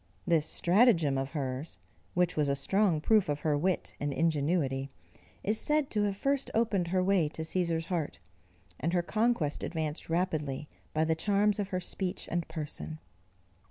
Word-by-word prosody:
This 160 -3 +2
stratagem 175 - +4
of 135 +2 -2
hers, 135 0 -3 0.4
which 180 0 +2
was 150 -2 +1
a 140 - +2
strong 175 +3 +2
proof 210 0 +3
of 145 0 -1
her 150 -2 +1
wit 180 +5 -1
and 145 0 -1
ingenuity, 145 -3 0 0.5
is 215 +2 +1
said 300 -2 +1
to 210 - +1
have 200 -1 -2
first 275 +3 0
opened 210 -6 +1
her 185 +1 +1
way 185 -5 +3
to 160 - -5
Cæsar's 165 -1 -1
heart, 165 -5 -2 0.6
and 165 +5 -1
her 175 -1 +2
conquest 215 -6 0
advanced 160 -2 -2
rapidly 155 -5 -1 0.2
by 155 - +1
the 160 0 +2
charms 205 +4 +2
of 200 - -1
her 185 -2 -2
speech 185 0 -4
and 170 -1 -1
person. 155 0 -5
170 Hz, 165 wpm, -30 LUFS, 150-195 Hz, 0.6 s, stratagem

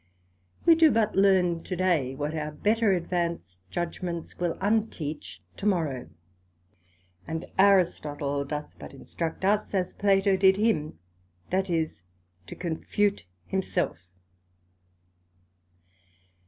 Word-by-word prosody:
We 335 - +8
do 325 -1 +6
but 225 -5 +1
learn 185 -4 +3
to 185 - -4
day, 165 -8 +1
what 145 +2 -3
our 150 -1 -3
better 215 +7 +2
advanced 170 - -2
judgements 175 0 -4
will 175 -2 -1
unteach 190 - -2
to 210 - -2
morrow; 155 -10 0 1.2
and 160 +1 -4
Aristotle 150 -7 +2
doth 150 +1 -5
but - - -10
instruct 165 +6 -4
us, 205 +1 +1
as 185 -2 0
Plato 195 -1 +3
did 190 0 +5
him; 205 - 0 0.5
that 190 +1 0
is, 160 - -1 0.5
to - - -8
confute 185 - -1 0.2
himself. 180 - -1
175 Hz, 110 wpm, -27 LUFS, 155-195 Hz, 1.2 s, We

